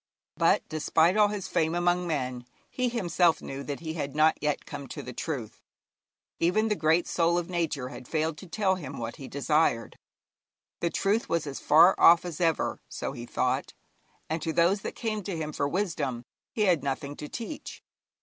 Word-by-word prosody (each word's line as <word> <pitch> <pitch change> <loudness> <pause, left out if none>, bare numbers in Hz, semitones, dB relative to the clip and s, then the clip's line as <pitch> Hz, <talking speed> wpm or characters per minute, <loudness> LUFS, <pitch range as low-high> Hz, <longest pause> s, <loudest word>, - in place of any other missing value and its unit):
But - - +2
despite 160 +3 +2
all 210 -1 +5
his 205 -2 -4
fame 165 -1 +1
among 175 0 +1
men, 130 -6 -2 0.3
he 255 -1 0
himself 175 -7 +2
knew 135 0 -6
that 140 +1 -5
he 160 -1 -4
had 145 -4 -4
not 155 +1 +4
yet 150 -1 -1
come 145 -2 -7
to - - -7
the 125 - -7
truth. 130 -6 -5 0.8
Even 215 +6 +2
the 210 - +2
great 160 +1 +2
soul 170 0 +2
of 175 +1 -3
Nature 155 -7 -1
had 130 -2 -10
failed 160 0 -1
to 190 - -11
tell 195 +1 +1
him 145 -7 -6
what 115 0 -5
he 135 - -8
desired. 140 -5 0 0.8
The 170 - 0
truth 205 +6 0
was 165 -2 0
as 140 -2 -5
far 165 +5 +6
off 170 +1 +7
as 175 -1 -5
ever, 165 -2 +1
so - - -4
he 120 0 -8
thought, 130 +3 -1 0.5
and 160 +1 -2
to 160 - -1
those 175 +5 +3
that - - -5
came 215 -2 -2
to 190 -3 -4
him 155 -1 -4
for 140 - 0
wisdom 150 -10 -2 0.3
he 220 - -3
had 180 -7 +3
nothing 140 +1 -3
to 150 - -7
teach. 245 +6 -7
160 Hz, 190 wpm, -28 LUFS, 140-180 Hz, 0.8 s, off